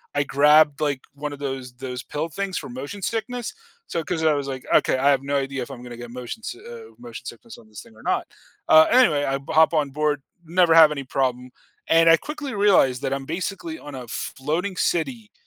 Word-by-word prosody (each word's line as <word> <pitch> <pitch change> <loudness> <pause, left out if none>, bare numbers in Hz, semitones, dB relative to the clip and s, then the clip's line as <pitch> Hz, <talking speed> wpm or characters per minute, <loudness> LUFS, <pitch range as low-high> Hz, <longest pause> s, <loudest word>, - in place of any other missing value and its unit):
I 145 - +2
grabbed, 150 +1 +4
like, 145 -3 0
one 145 0 -5
of 140 - -10
those 130 -3 -5
those 125 -1 -6
pill 155 +3 -4
things 195 +2 -4
for - - -6
motion 140 +11 -7
sickness, 230 +3 -3 0.3
so 165 - -3
'cause 160 0 -3
I 155 -1 +4
was 140 -1 -2
like, 130 -1 -5
"Okay, - - +3
I 140 +2 +3
have 135 -1 +2
no 140 0 0
idea 135 -1 -3
if - - -10
I'm 120 - -9
gonna 120 -1 -9
get 120 -1 -9
motion 125 - -7
si 370 - -6
oh, 465 -2 -11
motion 240 -1 -10
sickness 235 -2 -10
on 110 - -17
this 105 - -10
thing, 110 - -18
or - - -17
not." - - -1 0.4
Uh, 155 0 +8
anyway, 240 - +4
I 135 -1 0
b 140 - -18
hop 160 +1 +5
on 150 -3 +1
board, 150 -1 0 0.2
never 170 0 +3
have 160 -2 +8
any 140 -2 -4
problem, 130 -1 -1 0.4
and 165 0 +5
I 165 - +7
quickly 290 - -6
realized 190 -11 +3
that 135 - -1
I'm 135 -1 -4
basically 195 - -4
on 145 -2 -9
a 125 -2 -8
floating 160 - -3
city 210 +6 -1
150 Hz, 225 wpm, -23 LUFS, 135-180 Hz, 0.4 s, Uh